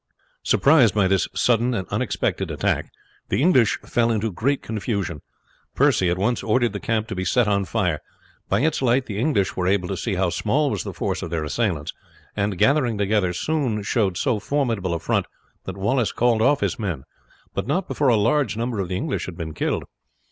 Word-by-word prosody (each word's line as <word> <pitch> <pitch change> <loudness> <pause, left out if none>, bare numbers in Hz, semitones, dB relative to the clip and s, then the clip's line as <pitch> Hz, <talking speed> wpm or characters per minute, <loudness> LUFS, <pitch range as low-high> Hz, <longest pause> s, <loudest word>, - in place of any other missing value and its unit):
Surprised 135 -8 +4
by 100 -3 +3
this 95 0 +2
sudden 120 +1 +2
and 95 -5 -3
unexpected - - -1
attack, - - -1 0.4
the - - +1
English 130 -8 +4
fell 120 -1 +1
into 110 -1 0
great 135 +9 -1
confusion. 100 - -3 0.5
Percy 90 - +3
at 90 - 0
once 110 +5 0
ordered 120 0 +1
the 100 - -3
camp 115 0 -1
to 115 - -5
be 95 0 -3
set 115 +5 +2
on 100 -1 +1
fire. 90 -8 -1 0.5
By 100 +4 +2
its 155 0 +1
light 130 +1 +2
the 105 -2 -5
English 115 -7 +1
were 90 -1 -1
able 95 -1 +1
to 95 - -2
see 100 0 -2
how 90 -1 +1
small 140 - +1
was 100 -6 -2
the - - -5
force - - -3
of - - -5
their 80 -2 -2
assailants, 80 -2 -1 0.4
and 100 -2 -1
gathering 130 - +2
together 100 -2 +1
soon 120 - -1
showed 100 -4 0
so 130 -4 0
formidable 110 -8 -1
a - - -2
front 85 - 0 0.4
that 95 0 -6
Wallace 120 +4 +1
called 120 -2 +2
off 145 +5 +3
his - - -1
men, 90 -11 -3 0.5
but - - -3
not 175 +7 0
before 145 - 0
a 120 - +5
large 115 +2 +1
number 115 -2 -2
of 95 - -1
the 90 - -1
English 145 +5 -3
had 90 -2 -8
been 80 -3 -5
killed. - - -1
110 Hz, 200 wpm, -23 LUFS, 95-125 Hz, 0.5 s, a